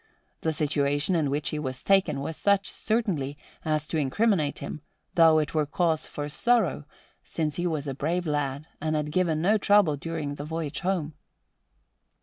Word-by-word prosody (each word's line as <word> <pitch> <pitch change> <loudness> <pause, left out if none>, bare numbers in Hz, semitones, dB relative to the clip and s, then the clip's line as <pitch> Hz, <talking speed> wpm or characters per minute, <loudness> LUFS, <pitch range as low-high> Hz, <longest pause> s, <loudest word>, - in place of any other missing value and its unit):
The 160 - +1
situation 145 +2 +1
in 155 -4 +1
which 145 +2 -1
he 150 - -3
was 130 -3 -5
taken 195 -8 +3
was 160 +3 -4
such, 200 +1 +2
certainly, 185 - -1 0.3
as 155 -1 0
to 160 - 0
incriminate 155 - +1
him; 140 +2 -6 0.3
though 160 -2 +5
'twere 150 -1 -1
cause 160 0 0
for 145 0 -5
sorrow, 205 -2 +1 0.4
since 155 -3 -3
he 175 0 0
was 155 -4 -2
a 140 - -3
brave 170 +6 -1
lad 145 -1 -1 0.2
and 155 0 0
had 150 0 -1
given 165 -2 +1
no 210 +4 +4
trouble 200 -7 +4
during 155 -1 -4
the 145 - -6
voyage 160 -1 -4
home." 175 -5 -1
155 Hz, 165 wpm, -27 LUFS, 145-175 Hz, 0.4 s, though